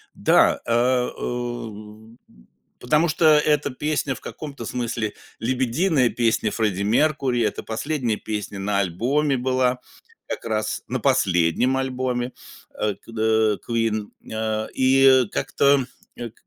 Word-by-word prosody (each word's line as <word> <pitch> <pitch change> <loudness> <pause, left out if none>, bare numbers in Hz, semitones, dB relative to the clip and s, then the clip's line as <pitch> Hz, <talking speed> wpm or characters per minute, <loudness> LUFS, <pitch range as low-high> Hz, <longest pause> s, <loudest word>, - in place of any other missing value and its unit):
Да, - - +3
э, 125 +2 +2
у, 110 -2 -6 0.6
потому 150 +7 +2
что 165 +1 0
эта 150 -2 +4
песня- 145 +1 -1
в 125 - -12
каком-то 140 -6 -8
смысле 115 -3 -3 0.3
лебединая 130 - +1
песня 115 -3 +1
Фредди 105 -4 -1
Меркьюри, 130 +2 +1
это 105 -3 -1
последняя 115 0 -2
песня 105 -2 -5
на 100 0 0
альбоме 130 - 0
была, 130 0 +1 0.5
как - - -5
раз 110 -1 -2
на 130 - -2
последнем 120 - +2
альбоме, 130 -1 -2 0.4
а, 105 -1 -1
кд 110 0 0
Queen, 115 -3 0 0.3
а, 110 0 -2
и 130 -1 +5
как-то, 140 -1 +2 0.3
к 120 -2 -6
120 Hz, 115 wpm, -23 LUFS, 110-135 Hz, 0.6 s, и